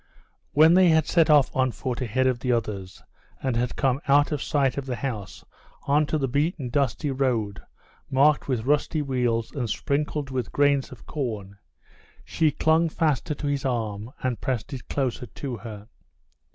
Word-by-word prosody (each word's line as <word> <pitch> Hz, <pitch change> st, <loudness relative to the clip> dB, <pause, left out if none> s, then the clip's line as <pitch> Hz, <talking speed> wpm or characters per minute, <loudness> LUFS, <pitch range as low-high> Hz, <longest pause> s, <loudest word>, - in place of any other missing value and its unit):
When 160 Hz, +3 st, +6 dB
they 185 Hz, -1 st, +6 dB
had 160 Hz, -1 st, +4 dB
set 165 Hz, -3 st, +3 dB
off 145 Hz, -3 st, +4 dB
on 130 Hz, 0 st, +2 dB
foot 125 Hz, +1 st, -4 dB
ahead 130 Hz, +2 st, 0 dB
of 130 Hz, -2 st, +1 dB
the 125 Hz, +1 st, -1 dB
others, 100 Hz, -5 st, -3 dB, 0.4 s
and 130 Hz, -3 st, 0 dB
had 120 Hz, +1 st, -1 dB
come 135 Hz, 0 st, +1 dB
out 145 Hz, +2 st, +4 dB
of 150 Hz, -3 st, -2 dB
sight 135 Hz, -3 st, +1 dB
of 140 Hz, -1 st, -4 dB
the 125 Hz, -, -2 dB
house 105 Hz, -5 st, -5 dB, 0.4 s
onto 150 Hz, +2 st, +2 dB
the 135 Hz, -3 st, 0 dB
beaten 145 Hz, 0 st, -1 dB
dusty 140 Hz, +2 st, 0 dB
road, 115 Hz, -8 st, -1 dB, 0.5 s
marked 145 Hz, +3 st, +3 dB
with 125 Hz, -4 st, -1 dB
rusty 150 Hz, +2 st, +1 dB
wheels 125 Hz, -4 st, -1 dB
and 125 Hz, -6 st, -3 dB
sprinkled 145 Hz, +3 st, -2 dB
with 125 Hz, -5 st, -3 dB
grains 145 Hz, -1 st, +2 dB
of 120 Hz, -6 st, -12 dB
corn, 105 Hz, -9 st, -5 dB, 0.7 s
she 160 Hz, -2 st, +2 dB
clung 160 Hz, +2 st, +2 dB
faster 155 Hz, -2 st, 0 dB
to 145 Hz, -, -6 dB
his 145 Hz, -1 st, -1 dB
arm 110 Hz, -4 st, -2 dB
and 125 Hz, -2 st, -1 dB
pressed 130 Hz, +1 st, -3 dB
it 130 Hz, -, -8 dB
closer 130 Hz, -3 st, -2 dB
to 125 Hz, +2 st, -6 dB
her. 105 Hz, -1 st, -9 dB
130 Hz, 170 wpm, -25 LUFS, 120-145 Hz, 0.7 s, When